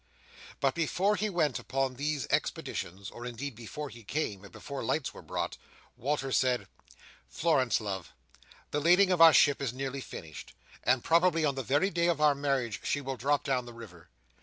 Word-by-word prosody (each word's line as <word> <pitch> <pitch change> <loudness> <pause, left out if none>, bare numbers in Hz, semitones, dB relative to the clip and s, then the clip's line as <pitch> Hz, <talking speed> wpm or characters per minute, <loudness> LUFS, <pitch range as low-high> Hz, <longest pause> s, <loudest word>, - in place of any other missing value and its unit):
But 135 -1 +2
before 185 +5 +1
he 210 +2 -1
went 160 -8 0
upon 135 0 -1
these 145 +1 -2
expeditions, 95 +3 -2
or 120 - -9
indeed 125 +3 -5
before 120 +6 -7
he 115 -2 -12
came, 105 -5 -3
and 100 - -12
before - - -7
lights - - -1
were - - -11
brought, - - -3 0.4
Walter 135 +1 -2
said: 125 -1 +1 0.6
"Florence, 145 -7 +2
love, 100 -5 -5 0.6
the 150 - 0
lading 180 +4 +5
of 175 -2 +2
our 165 -1 +11
ship 145 -2 +4
is 130 -4 -2
nearly 135 +1 -4
finished, 80 - -9 0.3
and 125 -1 +2
probably 165 -1 +3
on 140 - +2
the 135 - -3
very 145 - +1
day 170 0 +1
of 170 -3 +1
our 150 -1 +5
marriage 135 -6 -1
she 145 - 0
will 135 -1 -4
drop 140 +4 +1
down 130 -3 0
the 120 - -9
river. 90 -8 -12
135 Hz, 185 wpm, -30 LUFS, 120-155 Hz, 0.6 s, our